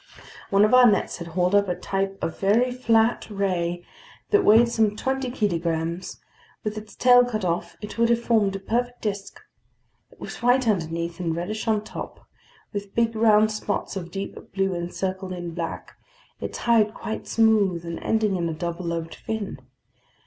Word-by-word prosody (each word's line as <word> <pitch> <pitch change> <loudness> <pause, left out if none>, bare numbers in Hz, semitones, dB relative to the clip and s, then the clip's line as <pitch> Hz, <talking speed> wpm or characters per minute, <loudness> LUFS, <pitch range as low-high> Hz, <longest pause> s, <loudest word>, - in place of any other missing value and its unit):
One 200 +1 +5
of 215 - +1
our 250 -1 +8
nets 200 - 0
had 170 - -7
hauled 180 +2 0
up 200 0 +4
a 180 - -1
type 195 +2 -2
of 165 - -3
very 225 +6 +3
flat 230 -2 +2
ray 175 -4 -1 0.5
that 415 -1 +4
weighed 225 +3 +6
some 220 -3 +1
twenty 265 +2 -2
kilograms; 170 -6 -2 0.4
with 215 -1 -3
its 215 0 -9
tail 245 0 +6
cut 220 -5 -2
off, 170 0 -2
it 210 +2 -7
would 235 0 +4
have 235 0 +3
formed 220 -4 +2
a - - -3
perfect 245 +5 -2
disk. 200 -2 -4 0.7
It - - -22
was - - -8
white 245 +1 +3
underneath 170 -3 -1
and 165 -2 -1
reddish 210 +7 -4
on 215 -2 +2
top, - - -8 0.5
with 200 -1 -6
big 230 -1 +1
round 215 -1 +4
spots 210 -2 -3
of 175 -3 -5
deep 195 +3 -5 0.2
blue 195 -1 +1
encircled 185 +2 -3
in 175 -2 -6
black, 165 -1 -5 0.5
its - - -5
hide 220 -3 +2
quite 220 - -5
smooth 205 -6 +2
and 170 0 -5
ending 215 -3 +1
in 170 -1 -1
a - - -2
double 170 +2 -4
lobed 165 -1 -3
fin. 220 -8 -5
200 Hz, 175 wpm, -24 LUFS, 175-225 Hz, 0.7 s, our